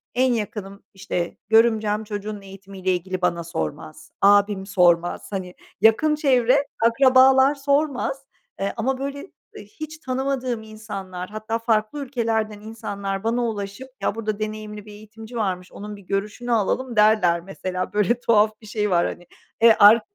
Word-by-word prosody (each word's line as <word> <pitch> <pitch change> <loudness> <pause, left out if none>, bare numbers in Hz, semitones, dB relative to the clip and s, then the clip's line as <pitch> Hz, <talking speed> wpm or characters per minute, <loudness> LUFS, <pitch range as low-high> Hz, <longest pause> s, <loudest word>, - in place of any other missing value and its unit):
en 255 0 +3
yakınım, 210 -3 -5
işte 180 -2 -4
görümcem, 220 -1 +3
çocuğunun 210 -1 -6
eğitimiyle 195 -1 -4
ilgili 185 +1 -4
bana 170 -1 0
sormaz. 155 - -6
Abim 200 -1 +4
sormaz. 175 -3 +2
Hani, 185 -2 -4 0.3
yakın 300 +8 +4
çevre 270 -2 +3 0.2
akrabalar 265 +3 +5
sormaz, 280 -1 -1 0.3
eee, 195 0 -1
ama 260 +4 0
böyle, 280 +5 -5 0.2
eee, - - -10
hiç 310 -6 -9
tanımadığım 260 -4 -2
insanlar, 195 -4 -7
hatta 215 +2 -3
farklı 225 +3 0
ülkelerden 225 -4 -1
insanlar 200 -3 -5
bana 235 +2 0
ulaşıp 205 +3 -5
"Ya - - 0
burada 215 -2 -3
deneyimli 215 -1 -5
bir 210 - -12
eğitimci 220 +3 -12
varmış, 185 -5 -2
onun 210 +1 -8
bir 200 - -13
görüşünü 210 +5 -3
alalım." 235 +3 0
derler 210 -5 +4
mesela, 185 0 -5
böyle 210 +4 +2
tuhaf 215 -2 +2
bir - - -14
şey 210 0 -1
var 175 -2 +3
hani. 175 0 -8 0.3
Eee, 230 -1 +7
ar 215 +3 +8
215 Hz, 145 wpm, -23 LUFS, 195-240 Hz, 0.3 s, ar